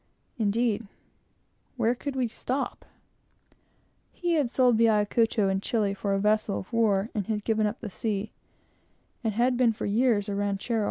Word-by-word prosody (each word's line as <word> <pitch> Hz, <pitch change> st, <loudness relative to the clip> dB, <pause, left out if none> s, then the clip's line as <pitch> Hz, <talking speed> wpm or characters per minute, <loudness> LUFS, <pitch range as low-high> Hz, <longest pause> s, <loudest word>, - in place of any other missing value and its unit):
indeed, 220 Hz, 0 st, 0 dB, 0.9 s
where 235 Hz, -1 st, +2 dB
could 275 Hz, +2 st, -5 dB
we 255 Hz, -2 st, +1 dB
stop? 255 Hz, +4 st, -4 dB, 1.3 s
He 350 Hz, -1 st, -1 dB
had 295 Hz, -7 st, +2 dB
sold 245 Hz, -2 st, +3 dB
the 230 Hz, 0 st, +5 dB
Ayacucho 215 Hz, 0 st, +2 dB
in 195 Hz, 0 st, 0 dB
Chili 205 Hz, -2 st, 0 dB
for 200 Hz, 0 st, -1 dB
a -, -, 0 dB
vessel 210 Hz, 0 st, +1 dB
of 190 Hz, -, -8 dB
war, 220 Hz, -2 st, +2 dB
and 205 Hz, -4 st, -2 dB
had 210 Hz, -2 st, -2 dB
given 220 Hz, -1 st, +1 dB
up 210 Hz, +4 st, -5 dB
the 215 Hz, -, -5 dB
sea, 210 Hz, 0 st, -3 dB, 0.9 s
and 220 Hz, -3 st, -1 dB
had 245 Hz, +2 st, +2 dB
been 240 Hz, -3 st, +3 dB
for -, -, -5 dB
years 215 Hz, -1 st, +2 dB
a 205 Hz, -, -2 dB
ranchero. 205 Hz, +3 st, -1 dB
220 Hz, 165 wpm, -27 LUFS, 205-240 Hz, 1.3 s, the